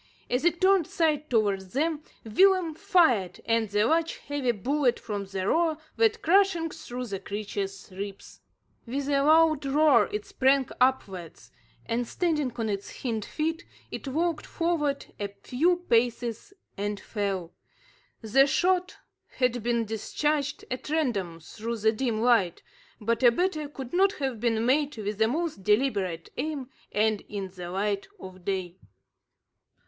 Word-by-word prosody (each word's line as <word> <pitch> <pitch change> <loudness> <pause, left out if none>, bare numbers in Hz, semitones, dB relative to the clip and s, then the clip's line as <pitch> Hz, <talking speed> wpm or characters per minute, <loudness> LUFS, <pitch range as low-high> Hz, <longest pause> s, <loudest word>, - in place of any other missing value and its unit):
As 250 +3 +1
it 345 0 +2
turned 375 -4 +4
side 305 -2 0
towards 200 -5 0
them, 305 +3 0 0.2
Willem 365 - +4
fired, 320 - +2
and 230 -2 +1
the 205 +1 +2
large 325 +4 +1
heavy 285 -4 -1
bullet 250 +4 0
from 205 -3 -4
the 190 0 -3
roer 325 +1 +2 0.2
went 450 0 +2
crashing 350 -2 +3
through 250 +1 -6
the 200 -4 -4
creature's 200 -1 -5
ribs. 195 +1 -8 0.5
With 275 +3 -3
a 280 -1 +3
loud 310 0 +5
roar 275 -5 +4
it 210 0 -3
sprang 265 0 +2
upwards; 195 -10 -1 0.4
then, 235 +1 0
standing 300 -2 0
on 230 -2 -2
its 200 -1 -5
hind 225 -4 -1
feet, 325 +1 -2 0.3
it - - -6
walked 325 +4 -1
forward 310 -5 -1
a 205 - -1
few 320 - 0
paces 235 - +1 0.2
and 205 0 -3
fell. 195 -6 -3 0.7
The 265 +5 +4
shot 365 +5 +1 0.3
had 250 -2 0
been 235 0 0
discharged 290 +7 -1
at 255 +3 -4
random 220 - -1
through 230 +7 -5
the 220 0 +3
dim 225 -1 -1
light, 225 -8 +3 0.4
but 230 +1 0
a 245 - +8
better 310 0 -1
could 265 -3 -8
not 385 +2 +4
have 265 -5 -3
been 225 -1 +1
made 285 +1 +2
with 210 -1 -4
the 220 - +4
most 310 - -2
deliberate 200 -6 +1
aim, 275 -2 -3 0.2
and 215 0 +1
in 200 -2 -4
the 180 -1 -8
light 200 +2 -1
of 185 - -11
day. 185 -2 -3
245 Hz, 145 wpm, -27 LUFS, 205-305 Hz, 0.7 s, a